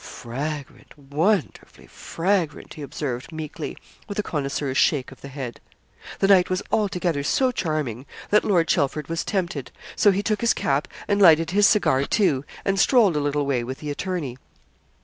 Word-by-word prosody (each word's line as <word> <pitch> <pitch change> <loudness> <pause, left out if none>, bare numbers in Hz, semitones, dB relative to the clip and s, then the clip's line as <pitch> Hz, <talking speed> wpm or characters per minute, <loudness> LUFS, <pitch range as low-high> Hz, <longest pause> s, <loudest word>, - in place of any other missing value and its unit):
'Fragrant 145 +5 -7
wonderfully 155 +7 -1
fragrant!' 170 -3 -2
he 155 - -10
observed, 135 -1 -5
meekly, 155 -2 -6 0.3
with 205 - -6
a 210 - 0
connoisseur's 140 -4 -2
shake 135 -2 +2
of 135 - -15
the - - -8
head. 135 -3 -7 0.6
The 195 - +2
night 190 -2 +5
was 185 +1 -1
altogether 180 -7 0
so 255 - +2
charming 150 - -3 0.2
that 210 - +5
Lord 175 -5 +2
Chelford 150 -1 0
was 165 0 -1
tempted. 170 - -2 0.3
So 210 - +5
he 200 +1 +1
took 215 -1 -1
his 235 - +3
cap, 140 +1 0 0.2
and 205 0 +1
lighted 165 -2 +6
his 205 +1 +5
cigar, 140 -10 +2
too, 145 -11 +1 0.2
and 195 -1 +1
strolled 220 - +4
a - - +2
little 145 0 0
way 130 -4 0
with 130 +2 -5
the 150 -1 -5
attorney. 145 -6 -4
155 Hz, 170 wpm, -24 LUFS, 140-195 Hz, 0.6 s, lighted